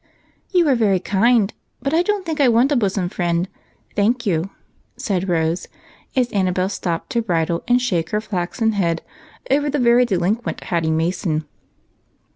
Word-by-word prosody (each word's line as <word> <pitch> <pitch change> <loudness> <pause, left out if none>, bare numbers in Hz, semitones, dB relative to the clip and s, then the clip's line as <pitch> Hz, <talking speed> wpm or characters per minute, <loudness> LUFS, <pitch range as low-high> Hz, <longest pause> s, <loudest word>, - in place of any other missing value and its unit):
"You 355 -4 +3
are 280 - +5
very 210 -6 +2
kind, 215 +3 +2 0.3
but 275 +3 -2
I 330 - +4
don't 400 +1 -1
think 320 -3 -1
I 275 - +6
want 240 +5 +3
a - - +3
bosom 195 -6 0
friend, 175 0 -1 0.5
thank 235 +4 +1
you," 175 -1 0 0.5
said 190 -2 -2
Rose, 165 0 0 0.5
as 250 -2 +1
Annabel 185 -1 +1
stopped 170 -4 -3
to 235 - +1
bridle 170 -5 -1
and 245 0 +4
shake 180 -10 -1
her 210 - 0
flaxen 215 +2 -1
head 170 -5 0 0.5
over 290 +1 +2
the 245 -3 +4
delinquent 200 +4 -1
Hatty 165 -2 -1
Mason. 160 -1 0
200 Hz, 155 wpm, -20 LUFS, 175-245 Hz, 0.5 s, I